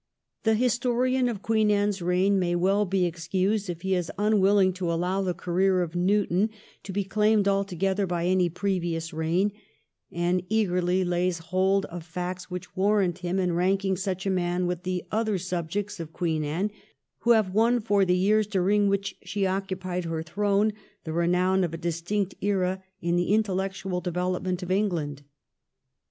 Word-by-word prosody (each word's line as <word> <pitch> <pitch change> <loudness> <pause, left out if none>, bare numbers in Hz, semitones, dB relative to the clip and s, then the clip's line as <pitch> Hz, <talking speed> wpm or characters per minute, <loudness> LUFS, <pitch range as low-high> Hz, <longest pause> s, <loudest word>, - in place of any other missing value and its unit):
The 220 0 +4
historian 250 +2 +1
of 210 -5 -5
Queen 220 -1 +2
Anne's 205 -1 +1
reign 185 +3 +2
may 175 -1 0
well 195 +4 +2
be 190 -1 +1
excused 185 +4 -1
if 170 0 -5
he 190 0 0
is 180 -3 -1
unwilling 200 -2 +3
to 180 -2 -2
allow 180 +3 0
the 180 -2 -1
career 185 +2 +1
of 165 -1 -6
Newton 195 +2 +2 0.3
to 195 - -7
be 200 +1 -1
claimed 210 +1 +2
altogether 195 0 0
by 175 -1 -1
any 180 -1 +2
previous 170 -3 -2
reign, 165 +6 +1 0.6
and 175 +1 0
eagerly 185 -4 +1
lays 175 0 0
hold 185 +4 +1
of 175 -1 -8
facts 180 +2 -5
which 180 0 -7
warrant 190 -2 +2
him 180 +1 -2
in 180 -2 +1
ranking 190 +2 +1
such 190 0 -3
a 195 - +1
man 180 -1 0
with 175 -1 -2
the 180 0 -3
other 220 -2 0
subjects 185 +3 -3
of 165 -1 -6
Queen 160 -3 -1
Anne 170 +8 -1 0.5
who 235 - +4
have 215 -5 +2
won 230 +3 +3
for 205 -3 +2
the 180 -1 +2
years 210 +3 +3
during 205 +1 +2
which 200 0 -1
she 200 -1 -2
occupied 185 -2 -2
her 165 -1 -3
throne 205 +5 +1 0.3
the 160 - -5
renown 180 +3 +2
of 165 -2 -2
a - - -5
distinct 175 +4 -2
era 190 -1 0 0.2
in 170 0 +1
the 175 +2 0
intellectual 190 -3 -1
development 180 +1 -2
of 180 - -4
England. 170 -8 -1
185 Hz, 170 wpm, -26 LUFS, 175-200 Hz, 0.6 s, The